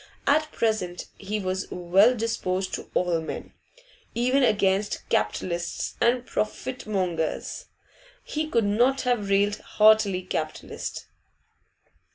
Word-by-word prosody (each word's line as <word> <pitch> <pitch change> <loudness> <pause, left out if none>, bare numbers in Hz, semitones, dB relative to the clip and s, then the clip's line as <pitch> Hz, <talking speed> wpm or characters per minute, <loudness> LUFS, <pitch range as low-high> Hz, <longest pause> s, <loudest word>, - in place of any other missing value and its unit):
At 305 +2 +2
present 215 -6 -1
he 210 +2 -3
was 190 0 -2
well 190 +7 +4
disposed 195 -5 -2
to - - -5
all 175 -2 +1
men; 160 - -6 0.6
even 255 +4 +2
against 200 -3 +1
capitalists 170 -1 -1
and 245 +1 +3
'profitmongers' 195 -10 -2 0.6
he 310 0 -3
could 230 -7 +2
not 245 +6 +3
have 240 -6 0
railed 200 +1 +2
heartily 210 -4 +4
Capitalists? 155 -4 -4
205 Hz, 105 wpm, -26 LUFS, 185-240 Hz, 0.6 s, well